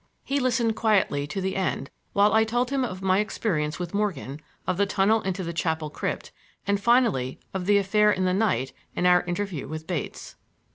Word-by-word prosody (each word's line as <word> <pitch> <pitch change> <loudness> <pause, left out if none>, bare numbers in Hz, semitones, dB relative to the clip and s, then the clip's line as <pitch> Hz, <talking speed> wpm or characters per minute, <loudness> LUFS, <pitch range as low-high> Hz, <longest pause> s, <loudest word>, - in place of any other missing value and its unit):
He 280 +1 0
listened 240 -3 +1
quietly 200 -11 +2
to 155 - -4
the 190 0 -2
end 185 -8 -2 0.2
while 205 +1 +4
I 220 0 +5
told 240 +3 0
him 275 -1 +1
of 190 -6 -4
my 190 0 +3
experience 160 -8 -1
with 175 0 -5
Morgan, 170 -9 -2 0.3
of 185 - -1
the 200 0 +2
tunnel 205 +3 +3
into 190 -1 -2
the 170 0 -4
chapel 160 -2 -1
crypt, - - -4 0.3
and 200 0 +1
finally 225 - +2
of 190 -1 -3
the 205 0 +5
affair 210 +2 +3
in 185 -2 0
the 185 - +2
night 185 - +1 0.2
and 180 - 0
our 180 0 +6
interview 175 -3 -3
with 155 +1 -6
Bates. 170 -5 -5
190 Hz, 195 wpm, -26 LUFS, 170-215 Hz, 0.3 s, our